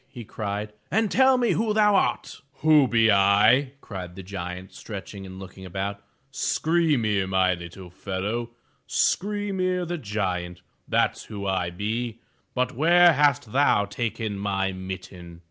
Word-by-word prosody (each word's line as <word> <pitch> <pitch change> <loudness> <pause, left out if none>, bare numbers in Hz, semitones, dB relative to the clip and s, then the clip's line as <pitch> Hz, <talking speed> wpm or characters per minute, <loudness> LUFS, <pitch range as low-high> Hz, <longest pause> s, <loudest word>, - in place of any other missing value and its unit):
'* - - -41
he 125 -4 -9
cried, 105 0 -4 0.2
"and 220 0 +1
tell 260 0 +5
me 240 -2 +2
who 215 -1 0
thou 210 -1 +4
art/' 195 - 0 0.2
''Who 155 -3 +6
be 115 -2 +4
I?'' 105 +7 +4
cried 90 -4 -8
the 95 - -8
giant, 90 -1 -7
stretching 100 -2 -8
and 95 0 -10
looking 95 0 -10
about. 100 +2 -4 0.3
"Skry'mir, 135 - +1
my 95 -1 +3
little 85 +1 -9
fellow, 105 +6 -3 0.2
— - - -42
Skry'mir, 190 -3 0
the 175 0 -3
giant, 90 -6 -3
— - - -45
that's - - +1
who 100 -2 -7
I 95 -3 0
be. 110 +5 -3 0.4
But 125 -1 0
where 170 +4 +6
hast 140 -6 +2
thou 130 -6 +3
taken 110 -2 -3
my 95 -1 -1
mitten?" 90 -2 -8
105 Hz, 150 wpm, -25 LUFS, 95-145 Hz, 0.4 s, Who